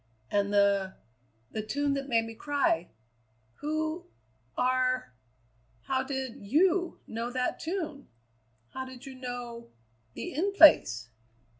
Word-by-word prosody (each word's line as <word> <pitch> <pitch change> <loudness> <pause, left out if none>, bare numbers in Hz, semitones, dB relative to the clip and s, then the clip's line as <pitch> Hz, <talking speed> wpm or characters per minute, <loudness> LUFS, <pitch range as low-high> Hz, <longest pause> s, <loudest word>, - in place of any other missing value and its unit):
"And 200 0 +1
the 200 -2 +3 0.6
the 215 - -2
tune 285 +6 0
that 275 0 -3
made 230 -2 +3
me 225 - -7
cry. 225 - 0 0.7
Who 315 +3 -2 0.5
are 255 - +1 0.7
How 260 -1 0
did 265 -2 -4
you 345 - +2
know 230 +2 -4
that 250 0 -1
tune? 320 -5 -4 0.6
How 260 - -5
did 260 0 -10
you 270 - -8
know 245 -2 -6 0.5
the - - -5
In 380 +8 0
Place?" 120 - +6
260 Hz, 120 wpm, -29 LUFS, 230-290 Hz, 0.7 s, Place